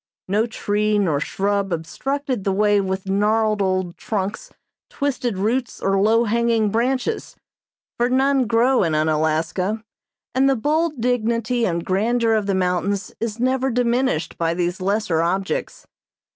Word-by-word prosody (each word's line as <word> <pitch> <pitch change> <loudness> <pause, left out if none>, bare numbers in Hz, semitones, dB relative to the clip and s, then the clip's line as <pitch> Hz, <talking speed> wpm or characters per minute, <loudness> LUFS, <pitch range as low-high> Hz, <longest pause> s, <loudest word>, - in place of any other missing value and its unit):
No 210 +4 +1
tree 210 -1 0
nor 170 -8 +1
shrub 200 +4 -1
obstructed 255 - -3
the 195 - 0
way 205 +1 +3
with 190 0 -3
gnarled 210 +2 +1
old 185 -2 -1
trunks, 200 -2 -4 0.4
twisted 250 -7 -2
roots, 235 +6 -1
or 195 0 +1
low 225 +3 +4
hanging 230 -1 +1
branches, 255 - -1 0.6
for 240 +1 +2
none 265 0 +2
grow 240 +3 +3
in 165 -5 +1
Unalaska, 160 +7 0 0.5
and 265 +2 +3
the 270 - +3
bold 305 +4 0
dignity 235 0 0
and 170 -1 -2
grandeur 225 +4 +1
of 215 -2 0
the 195 - +1
mountains 190 +2 -1
is 230 -1 -3
never 260 +2 +1
diminished 245 -6 0
by 165 0 0
these 175 +2 -2
lesser 195 -4 0
objects. 190 +4 -2
210 Hz, 140 wpm, -21 LUFS, 190-240 Hz, 0.6 s, low